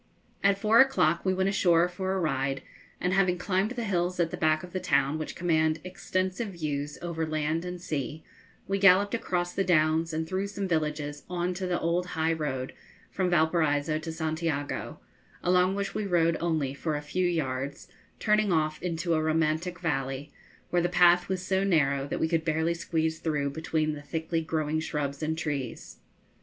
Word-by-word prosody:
At 200 0 +4
four 215 +3 +4
o'clock 245 -12 +4
we 190 - +2
went 190 +1 +1
ashore 175 -3 +4
for 185 +1 -3
a 190 - 0
ride, 135 -4 -1 0.4
and 180 +1 0
having 185 -2 +3
climbed 190 +3 0
the 245 -1 -4
hills 180 -3 -1
at 165 -2 +1
the - - -3
back 155 0 +2
of 180 - -10
the 185 - -1
town, 145 -3 +1
which 155 - -5
command 160 -2 +1
extensive 185 +3 -2
views 150 -3 -3
over 170 -2 -2
land 155 +1 -1
and 180 0 -5
sea, 155 -2 -4 0.4
we 195 0 0
galloped 200 +1 +5
across 175 -6 -1
the 195 - +1
downs 160 -2 +2
and 160 0 -2
through 190 +2 -1
some 200 -1 -4
villages 150 -3 -1
on 180 0 -1
to 185 +1 -3
the 175 -1 0
old 175 +2 0
high 160 +1 +2
road 135 -5 -3 0.4
from 185 -2 0
Valparaiso 155 -2 +2
to 160 +1 -5
Santiago, 160 -2 -3 0.4
along 180 +1 +3
which 200 0 -2
we 210 - -2
rode 170 -2 +3
only 155 -5 0
for 155 +2 -2
a 145 - -2
few 180 +5 0
yards, 140 -4 -2 0.3
turning 210 -2 +2
off 155 -2 0
into 170 -1 -1
a 155 - +2
romantic 160 +2 0
valley, 135 -2 -2 0.4
where 175 - +3
the 175 - +1
path 175 0 +5
was 185 -1 -2
so 190 0 +1
narrow 140 -7 +2
that - - -3
we 160 - +2
could 165 -1 0
barely 160 +1 +1
squeeze 160 -1 -1
through 145 -3 -1
between 155 0 -1
the 145 - -7
thickly 160 +3 -2
growing 155 -1 -1
shrubs 145 -2 -3
and 160 +1 -1
trees. 145 -6 -4
165 Hz, 185 wpm, -28 LUFS, 155-180 Hz, 0.4 s, galloped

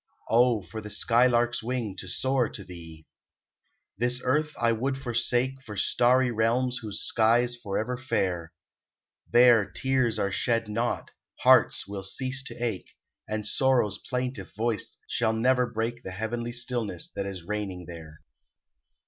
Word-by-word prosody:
Oh, 120 -2 +4
for 95 +5 -7
the 105 - -8
sky 120 +4 +3
lark's 120 -1 +1
wing 115 -4 -3
to 95 - -6
soar 130 +5 +1
to 100 - -8
thee! 80 -3 -11 0.9
This 125 +1 +1
earth 150 +4 +1
I 115 -1 +3
would 130 +4 -1
forsake 130 +1 0
For 105 -6 -9
starry 125 +5 +3
realms 120 +3 +1
whose 105 -3 -5
sky's 120 +2 +2
forever 115 +2 -3
fair; 90 - -1 0.8
There, 120 -2 +6
tears 130 -2 +1
are 100 - 0
shed 115 +3 0
not, 115 +3 -2 0.3
hearts - - +5
will 100 -1 -5
cease 130 +7 -2
to - - -7
ache, 115 -6 -3 0.4
And 110 -1 -2
sorrow's 120 -4 +2
plaintive 125 -6 -4
voice 110 -1 -2
shall 110 -2 0
never 125 +2 +2
break 115 +1 -3
The 95 - -7
heavenly 115 +5 -3
stillness 120 -7 -2
that 100 -1 -3
is 95 -3 -6
reigning 95 -2 -4
there. 80 -3 -11
115 Hz, 145 wpm, -27 LUFS, 100-125 Hz, 0.9 s, There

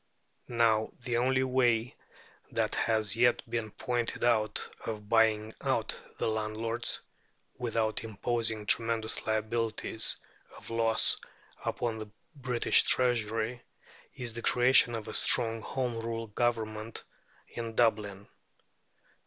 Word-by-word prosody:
Now, 115 -2 +2
the 120 -2 -1
only 130 +2 +2
way 125 -3 +2 0.5
that - - 0
has 110 -2 +1
yet 120 +1 +3
been 115 -2 -2
pointed 120 +2 -2
out 110 -3 +2 0.2
of 105 -2 -5
buying 110 -1 +3
out - - 0 0.2
the - - -1
landlords, 110 +2 -2 0.6
without 115 -3 -1
imposing 110 0 -2
tremendous 115 0 0
liabilities 110 0 0 0.4
of - - -11
loss 115 -1 +2 0.5
upon 115 -2 -2
the 110 -1 -7 0.3
British 125 -4 +3
Treasury, 120 -1 +1 0.5
is 120 -3 -3
the 120 - -5
creation 125 -1 +5
of 110 -2 -5
a - - -6
strong 115 -1 +3
Home 125 -1 -2
Rule 115 0 -3
Government 110 -1 -2 0.5
in 115 -1 -6
Dublin. 105 -4 +1
115 Hz, 110 wpm, -30 LUFS, 110-120 Hz, 0.6 s, creation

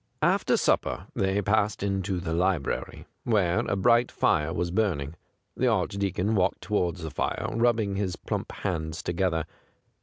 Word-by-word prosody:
After - - +3
supper - - +1
they 95 +1 0
passed 105 +1 +1
into 95 -2 -1
the 85 -2 -3
library, 90 -4 -1 0.2
where 95 -7 +2
a - - +1
bright 120 +4 +3
fire 75 +1 +1
was 85 +1 -2
burning. 85 -8 0 0.4
The 130 - +1
Archdeacon 100 -1 0
walked 95 -4 +1
towards 90 -5 -1
the 80 - -4
fire, - - -2
rubbing 115 -4 +1
his 95 -3 -1
plump - - -4
hands 80 -3 -3
together. 85 -2 0
95 Hz, 145 wpm, -27 LUFS, 85-105 Hz, 0.4 s, After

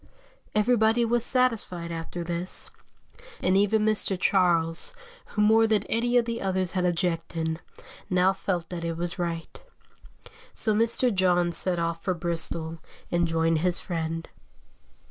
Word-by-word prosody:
Everybody 225 +1 +3
was 235 0 +1
satisfied 230 -10 +2
after 165 +1 -5
this, 170 +2 -5 0.7
and 185 - +2
even 210 +2 +3
Mr. 205 -3 +2
Charles, 175 - +2 0.3
who 210 - 0
more 225 +1 +5
than 215 -2 +2
any 240 +2 +1
of 240 - +3
the 230 0 -3
others 185 -2 -1
had 180 -1 0
objected, 165 -2 -1 0.5
now 185 0 +3
felt 180 -3 -3
that 175 -2 -5
it 165 -1 -3
was 175 +2 -3
right. 170 -1 -4 0.9
So 215 - +2
Mr. 230 +2 +2
John 180 -2 +2
set 180 +1 0
off 165 0 -2
for 185 - 0
Bristol 165 -1 -4 0.3
and 175 0 +2
joined 165 0 +1
his 180 +2 +3
friend. 165 -1 -3
180 Hz, 140 wpm, -26 LUFS, 170-215 Hz, 0.9 s, more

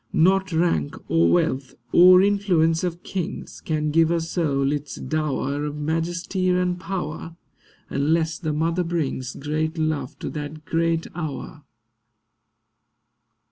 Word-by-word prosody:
Not 190 +3 +3
rank, 160 - +1 0.2
or 85 +1 +4
wealth, 130 +9 0 0.2
or 185 +1 +8
influence 185 -5 +2
of 175 -1 -3
kings 190 +1 -5
Can 155 -1 -1
give 165 +1 +4
a 170 0 +2
soul 150 -5 0
its 145 0 -3
dower 145 -2 -2
Of 150 0 -3
majesty 170 +4 -1
and 180 0 +1
power, 170 -3 -5 0.5
Unless 160 +3 0
the 155 -3 -2
mother 165 +4 0
brings 155 -7 -2
Great 155 +3 -2
love 155 -4 -2
to - - -5
that 150 +1 -6
great 165 0 0
hour. 155 -2 -6
160 Hz, 125 wpm, -23 LUFS, 150-175 Hz, 0.5 s, or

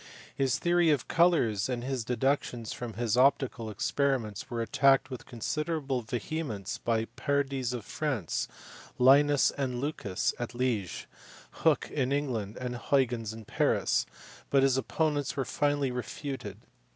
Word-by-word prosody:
His 135 -2 +1
theory 175 -1 +3
of 145 -5 +1
colours 145 - +3
and 120 -2 -2
his 130 -2 -2
deductions 125 -1 -1
from 120 -2 -6
his 115 0 0
optical 130 -3 +2
experiments 125 0 -1
were 120 -3 -3
attacked 135 +4 +3
with 130 - -7
considerable 140 +2 -2
vehemence 115 - -4
by 115 -1 0
Pardies 135 -2 -1
in 125 -2 -3
France, 120 - -2 0.5
Linus 140 +2 +5
and 130 -3 -2
Lucas 125 -9 -1
at 120 0 -4
Liege, 120 -8 -1 0.5
Hooke - - +1
in 135 -3 0
England, 120 -8 -2
and 125 -1 -4
Huygens 120 -4 +1
in 110 0 -9
Paris; - - +1 0.4
but 135 -1 +4
his 135 -2 +4
opponents 145 +2 0
were 135 - 0
finally 145 -1 0
refuted. 135 +2 -5
130 Hz, 135 wpm, -29 LUFS, 115-140 Hz, 0.5 s, Linus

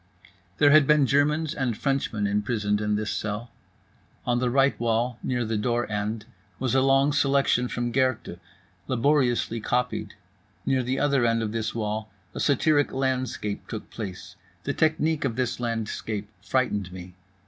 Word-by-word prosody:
There 145 -1 +5
had 150 -2 +6
been 150 -2 +5
Germans 145 +3 +2
and 125 -6 -1
Frenchmen 135 -7 -1
imprisoned 105 0 0
in 105 0 +1
this 105 0 -2
cell. 105 +3 -4 0.7
On 120 0 +1
the 125 0 +1
right 135 +2 +4
wall, 120 +1 0
near 125 -2 -1
the 110 -1 -1
door 120 +2 0
end, 105 +1 -2 0.3
was 130 -1 -1
a 135 - +4
long 135 +2 +4
selection 140 -3 +2
from 120 0 -2
Goethe, 130 -8 0 0.5
laboriously 125 -3 +1
copied. 115 -3 -1 0.5
Near 130 -1 +2
the 125 +2 -1
other 140 -3 +2
end 115 -1 +2
of 105 - -2
this 115 0 -3
wall 110 -1 -2 0.2
a - - -6
satiric 145 +1 +2
landscape 130 -5 -2
took 110 - -7
place. 100 -5 -7 0.3
The - - -1
technique 155 0 +1
of 125 -5 -1
this 125 -1 -1
landscape 110 -3 -3
frightened 105 -8 0
me. 90 0 -9
120 Hz, 155 wpm, -26 LUFS, 110-135 Hz, 0.7 s, had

